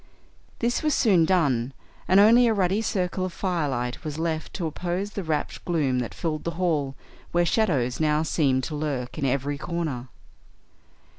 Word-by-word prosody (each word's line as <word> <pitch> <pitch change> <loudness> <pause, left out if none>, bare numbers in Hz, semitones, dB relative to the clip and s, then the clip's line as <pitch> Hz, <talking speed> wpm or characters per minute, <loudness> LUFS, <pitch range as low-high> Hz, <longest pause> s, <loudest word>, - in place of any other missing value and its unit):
This 240 +1 0
was 305 -2 +1
soon 185 -8 +4
done, 140 -9 +1 0.3
and 190 +2 +5
only 235 +4 +7
a 225 - +2
ruddy 195 +2 +1
circle 185 -3 -1
of 185 - -5
firelight 145 -11 -2
was 155 -2 -5
left 160 -1 -2
to 175 - -2
oppose 180 +5 -3
the 205 - -4
rapt 155 -3 -2
gloom 145 -7 +1
that 120 - -4
filled 155 -3 -3
the - - -1
hall, 150 -7 0 0.4
where 175 0 +2
shadows 145 - +1
now 155 0 +2
seemed 135 -5 +1
to 155 - -4
lurk 145 -4 -3
in 140 - 0
every 140 +2 -1
corner. 155 -7 -3
160 Hz, 165 wpm, -25 LUFS, 140-185 Hz, 0.4 s, only